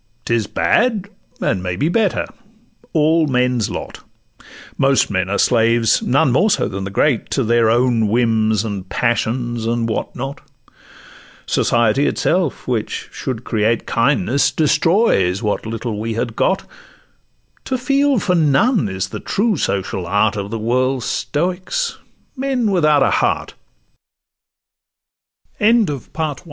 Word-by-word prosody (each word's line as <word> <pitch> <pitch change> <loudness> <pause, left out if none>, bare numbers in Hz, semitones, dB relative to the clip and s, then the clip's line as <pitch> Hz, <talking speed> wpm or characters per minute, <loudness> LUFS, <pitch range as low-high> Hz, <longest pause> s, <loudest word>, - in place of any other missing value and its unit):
'Tis 115 -3 0
bad, 210 - +1 0.3
and 95 - 0
may 90 -1 -3
be 145 - 0
better—all 190 -4 -1
men's 125 -3 +1
lot: - - -6 0.8
Most 135 -4 +2
men 95 -1 -1
are 100 - 0
slaves, 115 -1 +3
none 135 0 +2
more 185 - +3
so 205 - +1
than 95 0 -5
the - - -4
great, 120 +5 0
To 135 - 0
their 115 0 +3
own 120 -1 +2
whims 110 -1 +1
and 100 -3 -5
passions, 120 -1 -1
and 115 0 0
what 110 - -3
not; 135 +2 -6 1.0
Society 120 +4 +2
itself, 175 -4 -1
which 115 -4 -3
should 125 -3 -5
create 110 0 0
Kindness, 135 +1 +1
destroys 155 - +2
what 105 +1 -2
little 115 -1 -4
we 110 +1 -3
had 115 0 -3
got: 190 - +1 1.0
To 260 - -1
feel 275 +1 +2
for 185 -2 0
none 165 - +2
is 95 0 -3
the - - -6
true 215 +1 0
social 95 - -2
art 105 +4 +1
Of 100 -1 -4
the 115 - -4
world's 125 +3 0
stoi 175 +8 -2
120 Hz, 120 wpm, -18 LUFS, 110-155 Hz, 1.0 s, slaves